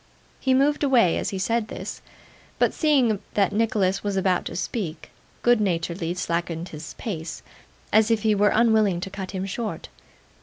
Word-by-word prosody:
He 260 -1 +2
moved 290 +3 +2
away 245 -11 +4
as - - -2
he 195 - -4
said 225 +3 0
this; - - -7 0.6
but - - +2
seeing 260 - +2 0.2
that 200 -1 +2
Nicholas 205 -3 +1
was 200 -1 -1
about 185 -1 +1
to - - -5
speak, 175 -4 -4 0.3
good 240 -2 +4
naturedly 170 -2 -1
slackened 170 -1 -2
his 155 0 -9
pace, 165 -7 -5 0.5
as 220 +1 +5
if 225 -2 +1
he 215 -1 +4
were 205 0 +4
unwilling 220 -5 +3
to 195 0 -5
cut 190 -1 -6
him 190 -1 -3
short. 215 +3 -4
200 Hz, 165 wpm, -24 LUFS, 180-225 Hz, 0.6 s, as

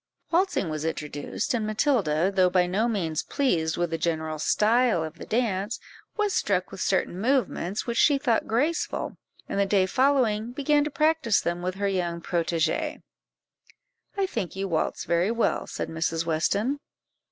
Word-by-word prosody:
Waltzing 345 - +1
was 155 -1 -3
introduced, 150 - -3
and 220 -3 -1
Matilda, 200 - +1
though 185 -1 +4
by 180 0 +3
no 200 +6 +1
means 170 -9 -1
pleased 170 - 0
with 175 -1 -1
the 165 - -2
general 160 -2 -1
style 220 +1 +3
of 160 +1 -7
the - - -8
dance, 215 -2 -1 0.4
was 415 -2 +1
struck 185 -3 0
with 195 - -7
certain 190 -1 0
movements 220 -6 0
which 235 0 -1
she 285 - +5
thought 250 -5 +1
graceful, 285 +9 -1 0.3
and - - -2
the 200 - +4
day 195 -1 +3
following 240 -1 +2
began 290 +2 +2
to 300 - -2
practise 305 -7 +2
them 175 +1 -2
with 185 +1 -2
her 200 +1 -1
young 175 -3 -1
protégée. 170 - -1 1.1
"I 395 - +2
think 220 - -4
you 195 +1 -2
waltz 165 -4 -1
very 170 +3 +2
well," 230 0 0
said - - -4
Mrs. 165 0 -1
Weston. 200 - 0
195 Hz, 165 wpm, -26 LUFS, 170-250 Hz, 1.1 s, she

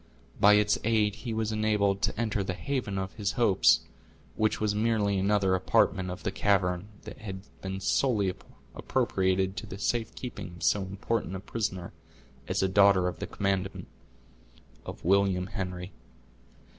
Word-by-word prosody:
By 105 +1 +7
its 105 0 +3
aid 110 -2 +2
he 110 +3 -6
was 110 0 -1
enabled 105 -2 +1
to - - -1
enter 110 -3 0
the 95 -1 -3
haven 125 -7 -3
of 95 0 -3
his 105 -2 -2
hopes, 110 -4 +4 0.5
which 110 0 +1
was 105 -1 +1
merely 105 -2 +1
another 100 -1 +2
apartment 95 0 +2
of 90 +1 -7
the 100 - -1
cavern, 95 -2 +1 0.2
that - - -10
had 95 -3 -6 0.2
been 95 0 -4
solely 100 -2 +1 0.4
appropriated 95 0 0
to - - -5
the 95 - -7
safekeeping 115 -2 -3
of 85 - -10
so 105 - +3
important 100 +1 -3
a - - -4
prisoner 95 -3 -4 0.5
as - - 0
a - - +3
daughter 100 -1 +5
of 90 - -4
the - - -4
commandant 95 -1 -2 1.0
of - - -8
William 95 -1 +3
Henry. 90 -2 -5
100 Hz, 155 wpm, -28 LUFS, 95-105 Hz, 1.0 s, By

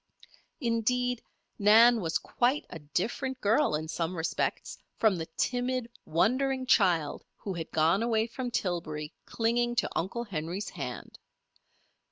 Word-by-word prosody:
Indeed, 245 0 0 0.4
Nan 225 +3 +7
was 165 -2 0
quite 255 +5 0
a 165 - -7
different 235 - -2
girl 225 - +3
in 155 +1 -3
some 170 +2 -3
respects 160 - -2 0.2
from 220 -4 +3
the 160 -1 -4
timid, 250 -1 -1
wondering 260 - +1
child 180 - +2
who 195 - -5
had 165 -2 -5
gone 165 +6 +3
away 225 -1 +2
from 245 +2 -5
Tillbury 155 -8 -3
clinging 240 +1 +1
to 240 - +2
Uncle 195 +7 -2
Henry's 180 0 -4
hand. 130 -7 -7
220 Hz, 130 wpm, -29 LUFS, 165-245 Hz, 0.4 s, Nan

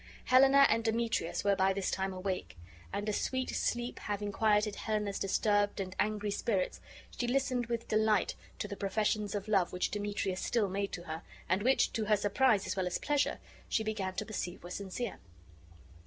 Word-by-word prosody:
Helena 270 +2 +7
and 230 - +2
Demetrius 225 -6 0
were 200 -1 +3
by 190 0 +3
this 195 -1 -1
time 190 0 -1
awake; 185 - -4 0.3
and 205 +1 -3
a 210 - 0
sweet 260 +4 -1
sleep 240 0 -1
having 205 0 -3
quieted 210 0 +2
Helena's 210 -2 -2
disturbed 205 +1 +1
and 185 -1 -4
angry 210 0 0
spirits, 200 -2 -1 0.3
she 245 - -1
listened 255 -1 +1
with 235 -1 -3
delight 215 -2 +2 0.2
to - - -3
the 200 - -5
professions 210 +1 0
of 205 +1 -3
love 195 -5 +2
which 180 - -1
Demetrius 205 -2 -2
still 220 -5 +1
made 200 +1 -2
to 175 - -5
her, 160 -1 -5 0.3
and 185 +3 +1
which, 260 +5 +3
to 220 - -1
her 210 0 +4
surprise 205 +1 +3
as - - -2
well 190 -2 0
as 180 - -1
pleasure, 290 -1 +1 0.3
she 220 - +1
began 200 -4 -2
to - - -2
perceive 185 -5 -5
were 175 - -8
sincere. 200 +4 -4
205 Hz, 185 wpm, -32 LUFS, 195-225 Hz, 0.3 s, Helena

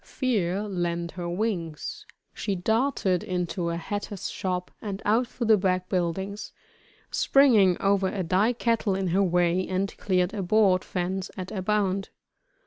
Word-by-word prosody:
Fear 205 -7 -1
lent 175 -4 -2
her 175 -2 -5
wings. 175 -5 -3 0.3
She 200 - -2
darted 215 -1 +1
into 180 -3 -2
a 170 - -2
hatter's 205 +2 -4
shop 180 -1 -3
and 200 -2 -4
out 230 +4 +3
through 240 0 -4
the 220 -1 +6
back 185 -1 0
buildings, 190 +3 -2 0.6
springing 220 -10 +5
over 195 -1 +2
a 190 0 -2
dye 190 +8 +2
kettle 230 -4 0
in 190 -1 -1
her 190 +4 +2
way, 180 0 +2
and 190 +1 -2
cleared 185 0 +1
a 205 - -2
board 190 -1 +3
fence 185 +1 -3
at 185 -1 -5
a 195 - -3
bound. 195 -1 0
190 Hz, 150 wpm, -26 LUFS, 180-210 Hz, 0.6 s, the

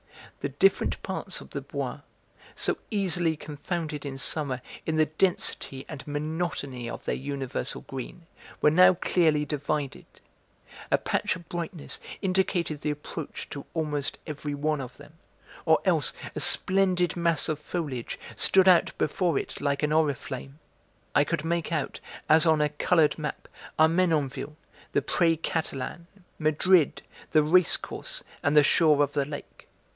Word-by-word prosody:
The - - -2
different 390 - +2
parts - - -3
of - - -13
the - - -4
Bois, - - -4 0.6
so - - +1
easily 175 -6 +1
confounded 150 0 -4
in 135 -2 -5
summer 135 -1 -1 0.3
in 160 - 0
the 155 0 +4
density 155 -4 -1
and 150 -4 -8
monotony 145 -5 -3
of - - -7
their - - 0
universal 135 -1 -4
green, 135 +6 -8 0.4
were 150 - +5
now 185 +3 +7
clearly 160 -4 +2
divided. 145 -1 -3 0.8
A - - +4
patch - - -1
of 175 -2 -12
brightness 170 -2 -4 0.2
indicated 185 -5 0
the - - -1
approach 150 +1 -6
to 140 - -7
almost 150 -3 -2
every 150 -2 -4
one 150 0 0
of 130 -1 -9
them, 145 +1 -14 0.5
or - - +6
else - - +2 0.2
a - - -2
splendid 185 -2 +4
mass 170 -2 +1
of 155 -2 -2
foliage 150 -6 -4 0.2
stood 190 0 +4
out 180 -2 +5
before 170 0 +1
it - - -4
like 140 0 0
an 150 - +1
oriflamme. 140 -3 -1 0.6
I - - +5
could 150 - -2
make 170 0 -1
out, 155 -4 -2 0.3
as 160 +2 +6
on 160 -1 +4
a 150 - +2
coloured 155 +1 +2
map, 150 -2 -5 0.3
Armenonville, 155 -3 +2 0.4
the - - +2
Pré 165 -3 +2
Catalan, 160 0 -3 0.3
Madrid, 155 +1 +3 0.3
the 155 -1 +4
Race 170 +2 +5
Course - - -6 0.2
and 145 +1 +2
the 150 - +8
shore 150 -1 +4
of 145 - -2
the 140 -1 +1
lake. 145 0 -9
155 Hz, 150 wpm, -27 LUFS, 145-170 Hz, 0.8 s, the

